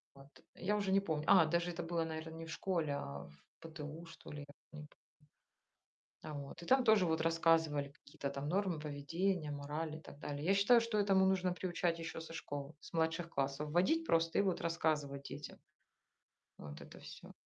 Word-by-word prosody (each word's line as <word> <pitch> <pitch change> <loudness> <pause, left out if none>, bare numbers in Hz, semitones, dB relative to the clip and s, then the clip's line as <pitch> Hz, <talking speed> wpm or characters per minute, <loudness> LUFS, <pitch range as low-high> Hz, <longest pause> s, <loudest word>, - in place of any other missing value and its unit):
Вот. 135 +1 -15 0.2
Я 210 +3 0
уже 200 -2 0
не 195 - +5
помню. 160 -6 -2
А, 185 -4 +8
даже 170 +2 +1
это 175 0 -4
было, 165 0 -1
наверно, 160 0 -5
не 165 0 -7
в - - -8
школе, 165 -6 -1
а 70 - -5
в 75 - -17 0.3
ПТУ, 160 0 -8
что 165 - -12
ли, 150 - -6
я 145 - -7 0.3
т 155 - -12
не 150 - -7
по - - -24 1.3
А, 155 - -6
вот. 140 +3 -7
И - - -8
там 265 0 +5
тоже 215 -5 +5
вот 160 0 +1
рассказывали 165 -3 +3
какие-то 140 0 -7
там 140 +1 -4
нормы 185 -3 0
поведения, 155 +3 -1
морали 150 +2 -4
и - - -13
так 145 - -12
далее. 145 0 -4
Я 195 - +4
считаю, 200 +5 +6
что 230 -2 -1
этому 195 -2 +4
нужно 185 -1 +2
приучать 175 -2 -1
ещё 165 0 -5
со 165 - -8
школы, 145 -2 -5
с - - -13
младших 165 +1 0
классов 140 +1 -1
вводить 250 - +3
просто 165 0 +2
и - - +5
вот 190 -3 0
рассказывать 155 -4 0
детям 140 +2 -8 1.0
вот 70 -1 -8
это - - -11
всё. - - -11
165 Hz, 200 wpm, -36 LUFS, 150-180 Hz, 1.3 s, А